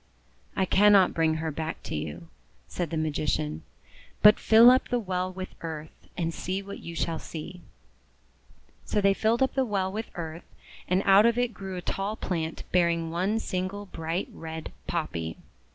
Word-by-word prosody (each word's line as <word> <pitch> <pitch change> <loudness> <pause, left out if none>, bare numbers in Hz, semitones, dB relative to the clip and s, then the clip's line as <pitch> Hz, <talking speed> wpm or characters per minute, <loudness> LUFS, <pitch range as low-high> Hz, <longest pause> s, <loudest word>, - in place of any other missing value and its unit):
"I 190 - +2
cannot 200 -1 +5
bring 160 -1 +2
her 160 0 -2
back 160 +2 -5
to - - -6
you," 75 +2 -5 0.4
said 175 - -3
the 160 - -3
THE 155 - +1
BAD 155 -1 -2
POPPY 155 - -2
SEEDS - - +3
25 - - -1
Magician, 75 +1 -7 0.6
'but 210 0 +8
fill 230 +2 +8
up 255 - +3
the 245 - 0
well 185 -4 -2
with 185 0 -7
earth, 155 -2 -8
and 165 -2 -1
see 190 +4 -3
what 200 0 -8
you 170 - -8
shall 165 -1 -1
see." 165 +4 -8 1.2
So - - 0
they 200 -1 +4
filled 225 +5 +2
up 265 - 0
the 265 - +2
well 195 -5 -1
with 220 +3 -5
earth, 165 -1 -7 0.3
and 185 +2 +2
out 200 +3 +7
of 235 0 +2
it 245 -1 0
grew 190 0 -6
a 180 - -6
tall 200 +2 -2
plant 165 -6 -3
bearing 170 -2 +2
one 185 +6 0
single 195 -1 -3
bright 165 -1 -3
red 160 -1 -7 0.2
Poppy. 85 - -3
180 Hz, 190 wpm, -27 LUFS, 160-205 Hz, 1.2 s, but